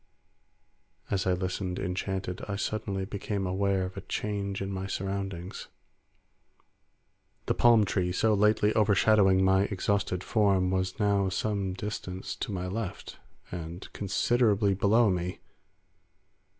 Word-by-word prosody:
As 95 -1 0
I 95 - +3
listened, 90 0 -2
enchanted, 95 0 -3
I 100 - -2
suddenly 100 -1 -2
became 100 0 -3
aware 95 0 0
of 95 - -7
a - - -5
change 100 -2 -3
in 95 0 -3
my 95 0 -4
surroundings. 95 -1 -4 1.8
The - - +1
palm 115 -3 +5
tree, 90 -2 0
so 110 +4 +2
lately 105 +1 +3
overshadowing 105 -2 +4
my 95 +1 +4
exhausted 100 -2 -1
form, 100 -4 +2
was 95 +1 -1
now 100 -2 +2
some 100 0 -1
distance 95 -2 -5
to - - -4
my 90 -2 -3
left 100 +1 -5 0.3
and 85 +1 -7
considerably 105 0 +2
below 105 +3 +3
me. 90 0 -2
95 Hz, 125 wpm, -29 LUFS, 95-105 Hz, 1.8 s, palm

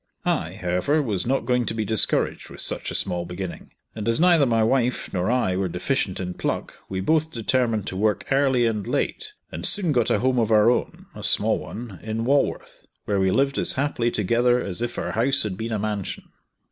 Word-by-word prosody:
I, - - -1
however, 90 - 0
was 110 -9 -2
not 135 +2 0
going 125 -2 +1
to - - -2
be 110 -1 -1
discouraged 110 0 +1
with - - -4
such - - -1
a - - -5
small 90 -2 0
beginning, 90 +1 -7 0.2
and 110 +1 -3
as 115 - +1
neither 170 -5 +5
my 115 -2 +2
wife 125 +1 0
nor 90 +1 0
I 120 -7 +1
were 95 0 0
deficient 90 +3 -2
in 90 -1 -4
pluck, - - -3 0.2
we 95 -1 -3
both 160 +8 +1
determined 115 -3 0
to 95 - -5
work 105 +2 0
early 135 -3 +3
and 105 -4 -1
late, - - -2 0.2
and 85 - -6
soon 180 - +4
got 120 -5 +2
a - - +3
home 125 +3 +1
of 115 -2 +1
our 110 +2 +6
own - - -3
a - - -9
small - - +2
one 110 -6 -8
in 110 +1 -3
Walworth, 140 +2 -1 0.2
where 100 -1 0
we 95 0 +2
lived 135 +7 +1
as - - +1
happily 130 -4 0
together 120 +4 +2
as 100 -2 -5
if 120 0 -3
our - - -2
house 120 +6 +2
had 105 -4 -3
been 115 +4 -5
a 110 - 0
mansion. 105 -2 -4
115 Hz, 210 wpm, -24 LUFS, 100-125 Hz, 0.2 s, our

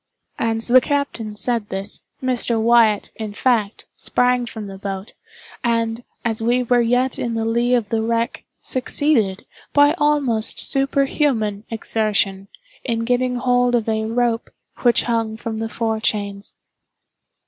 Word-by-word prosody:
As 225 0 +1
the 255 +1 +7
captain 245 -7 -2
said 230 -1 -1
this, 195 +2 -5 0.2
Mr. 245 -2 +1
Wyatt, 225 -2 +4
in 215 -2 -5
fact, 220 -4 0
sprang 250 -1 +1
from 220 -2 -7
the 195 -1 -9
boat, 195 +1 -5 0.5
and, 230 0 0 0.2
as 225 -1 -1
we 240 +2 +2
were 245 0 +3
yet 245 +2 +1
in 235 -1 -2
the 225 0 -1
lee 235 +2 +2
of 225 -4 -1
the 225 -1 0
wreck, 230 +1 -1 0.2
succeeded, 245 -6 0 0.3
by 290 +1 +5
almost 285 -7 +1
superhuman 270 -6 +1
exertion, 210 -3 0 0.4
in 230 -2 -1
getting 250 +1 +1
hold 245 0 +2
of 230 -2 0
a 220 -1 0
rope 235 0 0 0.3
which 240 -2 +3
hung 225 -2 -1
from 225 -1 -5
the 225 0 -3
fore 225 0 -1
chains. 205 -2 -2
230 Hz, 140 wpm, -21 LUFS, 220-245 Hz, 0.5 s, the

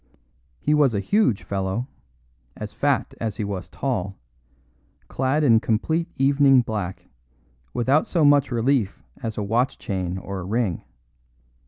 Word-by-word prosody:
He 150 - +1
was 145 -6 +3
a - - +1
huge 200 - +1
fellow, 95 +5 -2 0.7
as - - -7
fat - - 0
as 110 -3 -2
he - - -2
was 100 -3 -5
tall, 100 -8 -3 0.9
clad 135 +4 0
in 115 -6 +5
complete 160 +10 0
evening 135 -1 +5
black, 105 -5 -4 0.6
without 130 +5 +2
so 165 -4 +2
much 145 -1 +5
relief 120 -4 0 0.2
as 110 -2 -4
a 105 - -1
watch 120 +6 0
chain 95 -2 -3
or 95 0 -5
a - - -5
ring. 105 -3 -1
115 Hz, 140 wpm, -23 LUFS, 100-140 Hz, 0.9 s, in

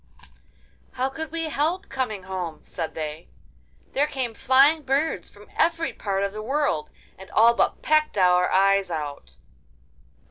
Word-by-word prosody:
'How 260 +1 -1
could 320 +3 -6
we 325 -1 -3
help 330 +7 -1
coming 230 -8 -3
home?' 185 -4 -5
said 160 - -5
they. 155 0 -5 0.7
'There 290 +2 +2
came 260 -5 -3
flying 270 +6 +4
birds 280 +3 -1
from - - -17
every 330 0 +1
part 195 -1 -2
of 200 0 -2
the 215 - -5
world, 265 - -1 0.3
and 190 - -11
all 230 +2 +5
but - - 0
pecked 305 -5 +2
our 180 -1 +4
eyes 195 0 +3
out. 145 - -6
235 Hz, 145 wpm, -24 LUFS, 185-295 Hz, 0.7 s, all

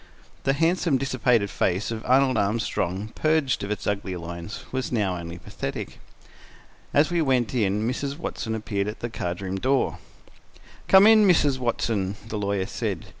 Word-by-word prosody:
The 135 - +3
handsome, 165 0 +2
dissipated 125 -5 +1
face 95 +5 0
of 110 -1 -4
Arnold 130 0 +4
Armstrong, 100 -2 -1
purged 155 -7 +1
of 100 - -4
its 105 -2 -3
ugly 100 -2 -2
lines, 85 +3 -7
was 130 0 -2
now 105 -6 0
only 85 0 -6
pathetic. 85 -5 -6 0.9
As 150 +4 +3
we 170 -1 +2
went 130 -6 +1
in 105 -2 +1
Mrs. 140 +3 -2
Watson 110 -8 -4
appeared 105 -2 -2
at 105 - -6
the 120 - -4
card 90 -3 -4
room 95 0 -3
door. 130 +4 +1 0.9
"Come 190 +1 +8
in, 215 -1 +7
Mrs. 145 -7 +3
Watson," 110 -5 -1
the 110 -2 -4
lawyer 100 -2 -1
said. - - -3
115 Hz, 160 wpm, -25 LUFS, 100-135 Hz, 0.9 s, Come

